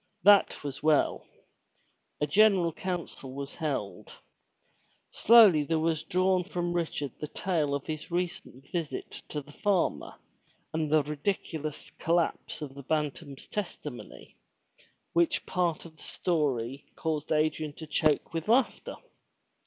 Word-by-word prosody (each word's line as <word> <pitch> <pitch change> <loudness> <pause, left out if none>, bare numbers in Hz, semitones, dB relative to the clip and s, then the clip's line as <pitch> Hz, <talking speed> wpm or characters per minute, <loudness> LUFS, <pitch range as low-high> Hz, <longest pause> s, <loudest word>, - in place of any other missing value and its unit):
That 200 -4 +5
was 140 -2 -5
well. 155 -1 +2 0.9
A 150 - +2
general 190 0 +4
council 170 -8 -5
was 140 0 -6
held. 145 - -4 0.9
Slowly 210 -9 +7
there 160 +2 0
was 160 -1 +1
drawn 185 0 +2
from 175 -2 -2
Richard 160 -5 -2
the 150 - -4
tale 155 -6 -1
of 140 - -4
his 155 -1 -5
recent 170 -6 -4
visit 165 -4 -3 0.2
to 150 - -3
the 145 - -15
farmer 190 +2 0 0.6
and 155 -1 -1
the 155 -1 +5
ridiculous 150 0 -3
collapse 170 -2 0
of 140 -2 -7
the 140 - -9
Bantam's 145 0 -3
testimony, 175 -10 -7 0.8
which 170 0 +2
part 175 -4 -1
of 160 -1 -13
the - - -17
story 140 -7 -1
caused 155 -2 -3
Adrian 155 -1 +1
to 160 - -9
choke 155 0 +1
with 165 -1 -3
laughter. 240 +3 +2
155 Hz, 130 wpm, -29 LUFS, 145-175 Hz, 0.9 s, Slowly